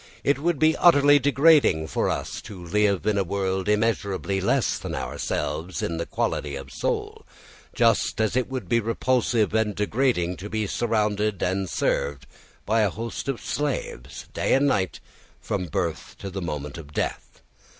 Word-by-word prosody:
It 140 -1 +2
would 170 +1 +1
be 155 +2 +4
utterly 145 -4 +6
degrading 140 - +4
for - - -1
us - - -3
to 100 - -10
live 100 +1 +1
in 105 -2 +2
a - - +2
world 95 +1 -1
immeasurably 100 -3 0
less 95 - +1
than - - -5
ourselves 85 -1 -3
in 85 - -2
the 85 - -3
quality 70 -1 -2
of 70 0 -8
soul, - - -3 0.5
just - - +2
as 110 0 +1
it 130 0 0
would 130 -8 -4
be 115 - +3
repulsive 115 -1 +1
and 110 -2 +1
degrading 105 -5 0
to 100 +3 -7
be 110 0 -1
surrounded 105 -2 0
and 95 0 -1
served 70 -2 -1 0.4
by 110 +2 +2
a 105 - +3
host 115 +7 -5
of 135 -3 -2
slaves, 140 - -4
day - - +2
and 135 +2 +3
night, 95 -10 0 0.4
from 90 - -3
birth 85 -1 -3
to 100 - -7
the 95 +1 -4
moment 75 -2 -5
of 75 -2 -12
death. - - -4
105 Hz, 165 wpm, -25 LUFS, 90-120 Hz, 0.5 s, utterly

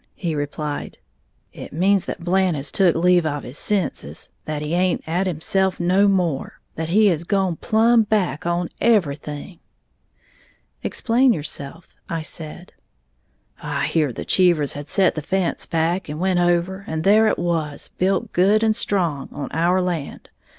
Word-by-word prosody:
he 170 -4 -3
replied. 145 0 -4 0.6
"It - - -9
means 190 +5 +2
that - - -6
Blant 185 -1 +2
has 135 0 -4
took 185 -4 +3
leave 175 +1 +4
of 145 -3 -2
his 130 - -7
senses, 205 -4 -2 0.2
that 150 -1 -3
he 150 +2 -3
aint 180 0 +1
at 175 +4 0
himself 185 +3 0
no 185 +3 +3
more, 175 -8 0
that 160 0 -4
he 210 +5 +4
has 165 -3 0
gone 190 -2 0
plumb 230 +1 +3
back 200 -9 0
on 175 0 -1
everything!" 160 -5 0 1.2
"Explain 250 +2 +2
yourself," 150 0 -7 0.2
I 165 -1 -3
said. 160 +2 -9 0.9
"I - - -2
heared 150 -7 0
the - - -5
Cheevers 170 -6 +3
had 145 0 -7
set 185 +3 +2
the 155 - -4
fence 185 +3 -1
back, 165 +2 0
and 150 +1 -5
went 185 0 +1
over, 175 +2 +1
and 160 0 -3
there 215 +4 +5
it - - +1
was, 165 -4 -2
built 190 +1 0
good 200 +5 +3
and 220 -1 +3
strong, 170 -11 -1
on 140 -3 -5
our 170 +4 +2
land. 170 -6 -4
175 Hz, 155 wpm, -22 LUFS, 155-190 Hz, 1.2 s, there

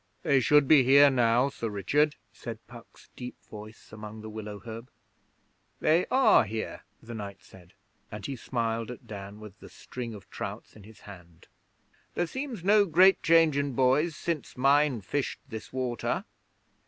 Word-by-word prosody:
'They 140 - +3
should 145 +3 +4
be 145 -3 +6
here 140 +2 +6
now, 120 0 +3
Sir 115 -4 -5
Richard,' 145 +9 +1 0.2
said 115 -1 -7
Puck's 120 -1 -16
deep 125 0 -8
voice 110 +1 -12
among 110 0 -9
the 110 0 -8
willow 105 -1 -7
herb. 115 +2 -9 0.9
'They 160 +3 +2
are 265 - +5
here,' 110 +1 -5 0.2
the 120 +1 -9
knight 100 -3 -8
said, 90 -2 -17 0.4
and 105 -2 -7
he 140 - -4
smiled 115 -2 -3
at 125 - -9
Dan 100 0 -9
with 105 -3 -12
the - - -13
string 120 -3 -8
of 95 -2 -13
trouts - - -7
in 105 -3 -14
his 110 0 -16
hand. 90 -4 -14 0.7
'There 175 - 0
seems 255 - -6
no 205 +2 +5
great 185 +4 +5
change 165 -2 +4
in 140 -1 -1
boys 135 +6 +2
since 165 -7 -4
mine 140 -2 +3
fished 135 +8 -3
this 110 -3 -8
water.' 125 -2 -2
120 Hz, 165 wpm, -28 LUFS, 110-145 Hz, 0.9 s, be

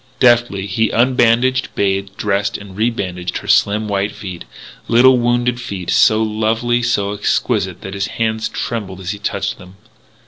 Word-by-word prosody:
Deftly 120 -5 +3
he 110 +2 0
unbandaged, 125 +1 +2
bathed, 100 0 -1
dressed, 100 0 -1
and 100 -2 -12
rebandaged 95 -5 -2
her - - -9
slim 105 +1 +2
white 100 0 -1
feet 95 - -8 0.4
little 125 +2 +5
wounded 120 0 0
feet 100 -7 -5
so 110 0 +4
lovely, 110 +3 0
so 105 -4 0
exquisite 105 - -1
that 95 - -7
his 100 0 -2
hand 110 -1 -1
trembled 100 -5 -4
as 90 -1 -4
he 105 - -7
touched - - -3
them. 90 +1 -14
110 Hz, 150 wpm, -17 LUFS, 100-120 Hz, 0.4 s, little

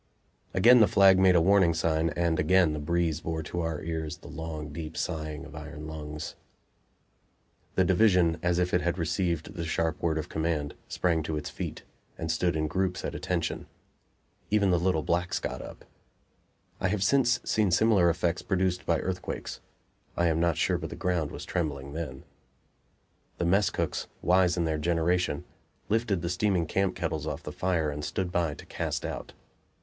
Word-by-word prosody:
Again 120 +6 +7
the 110 - +7
flag 95 -1 +6
made 95 -1 +5
a 85 - +6
warning 95 -2 +4
sign, 80 0 +1
and 85 -2 +1
again 90 0 +4
the 75 - -3
breeze 80 +1 0
bore 80 0 -3
to 85 +3 -4
our 80 -2 -2
ears 80 0 -3
the 85 - -14
long, 80 -1 -6
deep 80 0 -6
sighing 80 -2 -3
of 75 - -12
iron 75 0 -8
lungs. 75 0 -6 1.4
The 95 - +4
division, 90 -3 +4
as 90 -1 +1
if 90 0 0
it 90 - +3
had 85 +1 -1
received 85 +1 -1
the 85 -4 -4
sharp 80 0 -1
word 80 -2 +1
of 80 - -3
command, 80 -2 -1
sprang 85 -3 +1
to 80 0 -3
its 75 - -5
feet, - - -6 0.3
and 80 0 -2
stood 85 +1 +1
in 80 0 0
groups 95 +2 -1
at - - -3
"attention." - - -2 0.8
Even 100 -2 +3
the 90 - +3
little 85 -3 +1
blacks 90 +1 0
got 65 +1 -4
up. - - -10 0.9
I 95 - +1
have 100 0 0
since 120 +2 +3
seen 105 -3 +2
similar 95 -1 +4
effects 85 +1 0
produced 95 -2 0
by - - +3
earthquakes; 90 -1 -4 0.6
I 85 0 +3
am 80 0 +1
not 85 -1 +2
sure - - +1
but - - -5
the - - -7
ground 85 -5 -1
was - - -7
trembling 70 -5 -3
then. 75 -5 -5 1.1
The 85 - -1
mess 100 +4 +3
cooks, - - -2 0.2
wise 90 0 +4
in 85 - +1
their 80 -1 -1
generation, 85 -1 +1 0.5
lifted 105 -5 +1
the 85 - -1
steaming 90 -1 +1
camp 95 +4 0
kettles - - -3
off - - -4
the - - -6
fire 85 -5 0
and 75 +1 -5
stood 90 +3 -2
by 85 -4 0
to - - -12
cast - - -3
out. - - -6
85 Hz, 180 wpm, -28 LUFS, 80-90 Hz, 1.4 s, Again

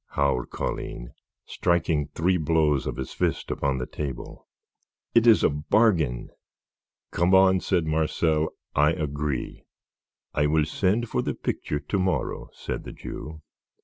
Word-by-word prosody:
howled 70 -3 +1
Colline, - - -5 0.3
striking 85 -4 0
three 90 +3 +2
blows 75 -4 +2
of - - -3
his 65 - -5
fist - - -1
upon 70 -2 0
the 65 - -3
table. 70 -4 -6 0.7
"It 115 0 +5
is 110 -3 +6
a - - +5
bargain." 75 - +1 0.8
"Come 90 +3 +3
on," 95 0 +6
said 90 -3 0
Marcel. 80 0 +1 0.2
"I 75 +2 +4
agree." 75 -3 -3 0.7
"I 75 0 +2
will 75 0 +2
send 100 +8 0
for - - -1
the - - -2
picture 75 - -3
to 80 +7 -2
morrow," 95 0 -1
said - - -5
the - - -8
Jew. 80 0 -8
80 Hz, 140 wpm, -26 LUFS, 75-90 Hz, 0.8 s, is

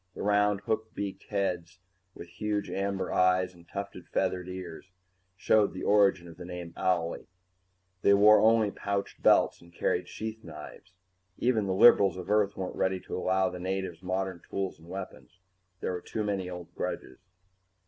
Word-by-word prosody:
The - - -5
round, 105 0 +2
hook 110 +2 -2
beaked 100 -1 -5
heads, 90 -4 -2 0.4
with 85 - -9
huge 105 +4 -3
amber 100 0 -2
eyes 90 0 +3
and 85 -1 -19
tufted 100 -2 -6
feather 95 -1 0
ears, 90 0 -8 0.5
showed 105 +2 +3
the 95 - -6
origin 100 -4 +3
of 85 - -12
the - - -8
name 90 -1 -7
"owlie." 85 -2 -1 0.7
They 100 - +5
wore 105 +2 +7
only 110 -1 +4
pouched 100 0 -3
belts - - +4
and 85 0 -17
carried 85 - -1
sheath 110 0 -6
knives; 80 +2 -11 0.4
even 115 -5 +1
the 95 - 0
liberals 100 -3 +6
of 90 +2 -5
Earth 105 -1 +2
weren't 95 -1 -4
ready 95 0 0
to - - -6
allow 95 0 +1
the 90 - -7
natives 95 -2 -3
modern 95 -1 -3
tools 95 -1 -3
and 80 - -16
weapons. 95 -1 -8 0.4
There - - -1
were 90 -1 -4
too 110 - -4
many 100 -3 -2
old 90 -1 -8
grudges. 65 - -5
95 Hz, 170 wpm, -29 LUFS, 90-100 Hz, 0.7 s, wore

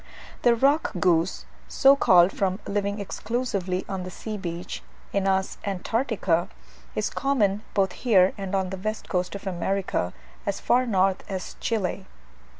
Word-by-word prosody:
The 240 -1 +5
rock 280 +6 +2
goose, 175 0 +2 0.2
so 275 0 +5
called 180 -8 +6
from 190 0 -1
living 200 0 -1
exclusively 200 -3 -2
on 190 -1 -3
the 180 - -5
sea 215 +4 -6
beach 175 -2 -5 0.3
(Anas 190 -1 +1
antarctica), 200 -3 0 0.5
is - - -1
common 215 -8 +1
both 195 -2 +3
here 190 -4 +4
and 195 -1 -3
on 190 -1 0
the 190 - -4
west 215 +3 -4
coast 180 +1 -1
of 200 - -8
America, 185 - -1 0.3
as - - -2
far 250 +1 +2
north 190 -3 +2
as 190 -2 -5
Chile. 195 -4 -2
195 Hz, 145 wpm, -26 LUFS, 185-215 Hz, 0.5 s, called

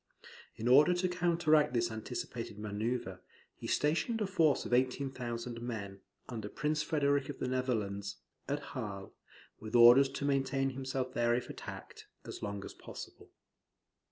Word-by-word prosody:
In 115 - -3
order 150 +8 +7
to 180 +1 +1
counteract 165 -5 +2
this 120 0 +1
anticipated 110 -1 -5
manoeuvre, 105 -1 -3 0.4
he - - -7
stationed 170 +10 +1
a 210 - +1
force 165 -6 +2
of - - -3
18,000 125 -2 -1
men, 100 -5 -5 0.3
under 110 -4 -5
Prince 150 +4 -1
Frederick 145 -2 +1
of 145 - -5
the - - -2
Netherlands, 105 -6 -1 0.3
at 145 +1 -2
Hal, 100 -7 -5 0.5
with 110 +2 -6
orders 120 +3 +8
to 140 +1 -4
maintain 135 -1 +1
himself 130 -1 -3
there 120 0 +2
if 125 - -3
attacked, - - -9 0.2
as - - -7
long 100 -1 -4
as - - -8
possible. - - -10
130 Hz, 145 wpm, -33 LUFS, 115-145 Hz, 0.5 s, orders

